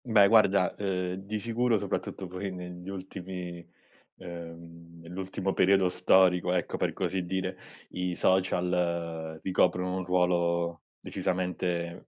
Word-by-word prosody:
Beh, 110 -4 +6
guarda, 100 -4 +5
uhm, 90 -3 -1
di 100 +3 -4
sicuro 115 +2 +1
soprattutto 95 - -3
poi 95 +2 -5
negli 90 0 -8
ultimi 90 -2 -6 0.5
uhm, 85 -1 -10
nell'ultimo 95 +2 -3
periodo 95 -1 +4
storico, 90 -1 +4
ecco, 90 -3 -1
per - - 0
così 95 -1 -2
dire, 95 +1 -2 0.3
i 90 -1 -2
social, 85 -3 0
ricoprono 90 0 +1
un 95 - -2
ruolo 85 -2 +1 0.2
decisamente 90 -2 -2
90 Hz, 115 wpm, -29 LUFS, 85-95 Hz, 0.5 s, Beh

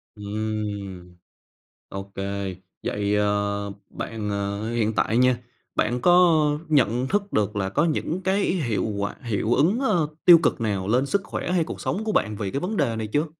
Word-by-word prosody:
Ừm. 100 -3 -5 0.7
Ô 95 0 -5
kê, 100 -1 -3 0.3
vậy, 105 0 0
ờ, 100 -1 0 0.2
bạn 110 -2 -5
ờ, 100 +2 -2
hiện 110 -2 +1
tại 115 - +1
nha, 125 -1 +4 0.4
bạn 120 +1 0
có 175 -2 +6 0.3
nhận 125 -4 +2
thức 200 +2 -1
được 105 0 +1
là 95 -1 -1
có 150 +10 +2
những 165 +3 -1
cái 195 +2 +1
y - - +1
hiệu 115 -8 0
quả 100 0 -2
hiệu 115 -1 0
ứng, 185 - +3
ơ, 175 - +2 0.2
tiêu 175 -2 +10
cực - - +1
nào 100 -4 -1
lên 125 +5 +2
sức 200 +7 0
khỏe 180 - -4
hay 175 -3 +2
cuộc - - -7
sống 210 +4 -2
của 220 - -1
bạn 105 - +1
vì 100 -3 -3
cái 140 - -1
vấn 200 +3 -3
đề 115 -1 +1
này 110 -1 -3
chưa? 150 +2 +2
110 Hz, 190 wpm, -24 LUFS, 100-155 Hz, 0.7 s, tiêu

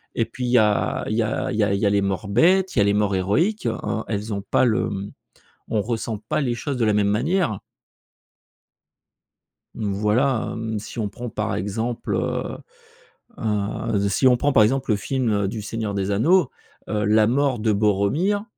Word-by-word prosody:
et 115 - +1
puis 125 +3 -6
il 120 - -1
y 125 - +5
a 105 -1 +1
il 110 - -1
y 115 - +2
a 110 - -2
il - - -3
y 110 - +3
a 100 -1 +1
il 100 - 0
y 105 - 0
a - - +4
les 100 0 +2
morts 100 +1 -2
bêtes, 180 - +3
il - - +2
y - - +6
a 100 - +4
les 100 - +2
morts 105 -1 +1
héroïques, 155 - 0
heu, 115 -1 0 0.3
elles 105 0 -3
ont 100 - -3
pas 100 - +2
le, 115 -1 +1
mmh, 100 -1 -5 0.6
on 110 - +1
ressent 115 0 -3
pas - - 0
les 125 -4 0
choses 140 +2 -4
de 115 - +1
la 105 - +2
même 105 -1 +2
manière. 125 - 0 2.2
Mmh 105 -2 -2
voilà, 110 +5 +1
hem, 110 -1 -3
si 110 - -10
on 105 - -1
prend 120 +4 -7
par 110 0 -2
exemple, 110 +5 -3
heu - - -2 0.8
heu, 105 -1 -1
si 130 +6 +3
on 125 - +6
prend 145 +3 +1
par 110 - +6
exemple 130 +3 +1
le 105 - +2
film, 125 +3 -1
heu, 100 -1 +1
du 105 +2 -4
Seigneur 110 0 -4
Des 100 0 -1
Anneaux, 155 - +3 0.4
heu, 105 0 0
la 105 +1 +4
mort 130 0 +1
de 110 0 +1
Boromir, 105 - +1
110 Hz, 210 wpm, -23 LUFS, 100-125 Hz, 2.2 s, y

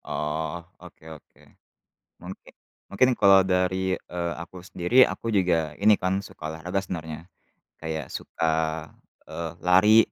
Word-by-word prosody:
Oh, 80 +3 -3 0.2
oke - - -15
oke. 75 - -18 0.8
Mungki 90 +1 -10 0.4
mungkin 125 +6 +2
kalau 100 -1 +7
dari, 95 0 0
eee, 85 -1 -4
aku 85 +1 -9
sendiri, 95 +7 +3
aku - - -7
juga 85 -5 +1
ini, 105 +1 +7
kan, 95 +1 0
suka 80 - -10
olahraga 90 +4 -3
sebenarnya, 80 -3 -7 0.5
kayak 80 -4 -5
suka, 85 - -6 0.8
eee, 85 -1 -5
lari. 95 +5 +5
90 Hz, 125 wpm, -25 LUFS, 80-95 Hz, 0.8 s, kalau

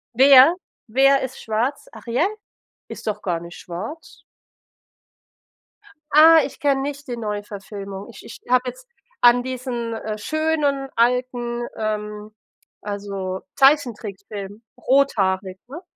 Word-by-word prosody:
Wer 270 +4 +8 0.3
wer 270 +4 +4
ist 260 0 -6
schwarz? 230 +6 -2
Ariel? 250 +9 -1 0.6
Ist - - -9
doch 215 - -2
gar 175 -3 -2
nicht 170 +1 -11
schwarz. 215 - -8 1.9
Ah, 320 +2 +8
ich - - -9
kenne 275 -2 +1
nicht 285 0 -5
die 245 -2 -4
Neuverfilmung. 205 -1 -6
Ich 220 - -13
ich - - -11
habe 250 0 +4
jetzt - - -13 0.3
an 245 0 +6
diesen, 250 -2 -4
äh, 215 -1 -5
schönen, 300 0 -1
alten, 240 0 0
ähm, 210 -1 -4 0.5
also 200 -2 -5
Zeichentrickfilm 215 -7 0 0.2
rothaarig, 195 -9 +1
ne? 310 +7 -9
240 Hz, 115 wpm, -22 LUFS, 205-275 Hz, 1.9 s, Wer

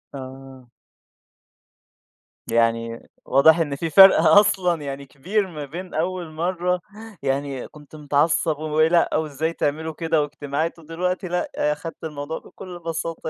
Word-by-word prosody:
آه. 130 -1 -10 1.8
يعني 115 0 0 0.2
واضح 160 +5 +5
إن 145 -4 -1
في 165 +3 -3
فرق 190 +5 +9
أصلًا 180 -5 +4
يعني 140 -1 -6
كبير 190 +10 -2
ما 155 -5 -7
بين 175 +6 -8
أول 175 +1 -2
مرّة 180 +2 -1 0.4
يعني 135 -1 -2
كنت 150 0 -15
متعصّب 150 +2 +1
و - - -6
ولأ 165 +2 +3
وإزاي 160 +1 -2
تعملوا 160 +2 -2
كده 160 -1 0
واجتماعات 150 +2 -3
ودلوقتي، 180 +4 -3
لأ، 180 0 -2
أخدت 150 +2 -3
الموضوع 150 0 -5
بكل 180 -2 -11
بساطة، 165 -1 -4
160 Hz, 125 wpm, -22 LUFS, 140-170 Hz, 1.8 s, فرق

